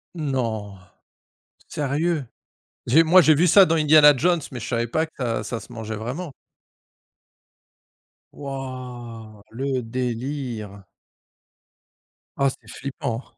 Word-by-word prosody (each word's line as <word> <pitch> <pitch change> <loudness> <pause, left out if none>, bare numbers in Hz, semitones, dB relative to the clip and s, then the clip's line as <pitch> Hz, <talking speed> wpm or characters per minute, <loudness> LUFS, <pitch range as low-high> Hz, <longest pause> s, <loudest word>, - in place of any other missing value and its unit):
Non, 115 - -3 0.9
sérieux? 150 +2 -1 0.6
J'ai 155 +7 +5
moi, 180 +3 +6
j'ai 155 -2 +5
vu 175 +5 +3
ça 195 +3 +7
dans 165 - +1
Indiana 150 -1 +7
Jones, 170 +5 +2
mais 125 - -6
je - - -6
savais 120 -1 -1
pas 160 +7 0
que 160 - -20
ça 115 -4 -2
ça 115 +2 -4
se 115 +3 -14
mangeait 110 -2 -5
vraiment. 135 +9 -5 2.0
Wouah! 125 -5 -8
Le 130 +2 -2
délire. 120 -3 -4 1.5
Ah, 140 0 +3
c'est 115 -4 -12
flippant. 125 -1 -5
130 Hz, 115 wpm, -23 LUFS, 115-150 Hz, 2.0 s, ça